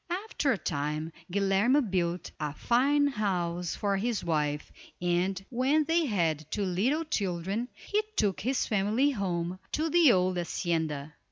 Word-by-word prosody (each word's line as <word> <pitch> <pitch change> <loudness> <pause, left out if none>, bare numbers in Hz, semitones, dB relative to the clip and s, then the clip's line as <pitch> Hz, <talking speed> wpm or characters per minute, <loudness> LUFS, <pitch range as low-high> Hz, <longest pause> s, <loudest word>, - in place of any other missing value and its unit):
After 295 -10 0
a 225 - +1
time, 150 0 -2 0.2
Guilerme 200 +7 +3
built 175 -1 -1
a 150 -1 -3
fine 280 - +3
house 180 -9 -1
for 200 -1 0
his 230 +2 -1
wife, 150 -3 -1 0.3
and, 180 +2 0
when 265 +5 +2
they 330 +1 +2
had 160 - 0
two 205 - -1
little 225 - +1
children, 195 - -2
he 420 +1 -1
took 200 - +1
his 260 +4 0
family 215 +7 +2
home 180 -5 -2
to 315 +1 0
the 335 -5 +6
old 185 -2 +2
hacienda. 160 -4 -2
195 Hz, 145 wpm, -29 LUFS, 170-250 Hz, 0.3 s, the